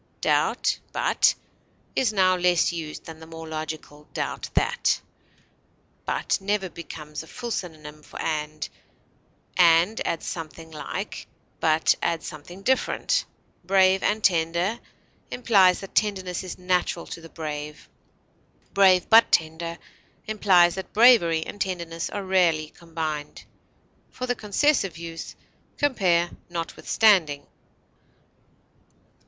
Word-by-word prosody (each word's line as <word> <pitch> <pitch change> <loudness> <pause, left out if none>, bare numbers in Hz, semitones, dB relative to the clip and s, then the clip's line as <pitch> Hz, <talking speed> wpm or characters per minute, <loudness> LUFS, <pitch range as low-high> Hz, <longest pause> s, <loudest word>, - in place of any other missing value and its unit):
"Doubt - - +1
but" - - +2 0.6
is 250 -5 +2
now 185 -3 +3
less 180 -1 +2
used 160 -3 -6
than 160 -1 -10
the 160 - -12
more 165 0 -9
logical 155 -1 -7
"doubt - - -3
that." 485 +1 +2 1.1
But - - 0
never 195 -1 -1
becomes 150 -2 -8
a 160 - -13
full 240 +3 -6
synonym 155 -6 -6
for - - -12
and; 155 -1 -3 0.9
and 175 +4 +5
adds 165 - -2
something 160 0 -7
like, 150 -2 -6 0.3
but 160 0 +3
adds 170 -1 -1
something 175 +6 -9
different; 265 - +1 0.4
"brave 190 +1 +4
and 215 0 0
tender" 170 +5 +1 0.5
implies 195 -7 +4
that 195 - -10
tenderness 190 -4 0
is 185 - -7
natural 180 -1 0
to 165 - -8
the 165 - -12
brave; 150 -2 -6 0.9
"brave 185 -2 +5
but 225 0 +6
tender" 165 +1 0 0.5
implies 190 -5 +4
that 190 0 -7
bravery 205 -9 +5
and 205 - -8
tenderness 170 -3 -3
are 205 - -4
rarely 170 -5 +2
combined. 160 -3 -5 0.6
For 255 - -5
the 245 - 0
concessive 210 - +1
use, 165 0 -7 0.4
compare 180 -11 +2 0.2
NOTWITHSTANDING. 170 -2 +2
175 Hz, 115 wpm, -25 LUFS, 160-195 Hz, 1.1 s, but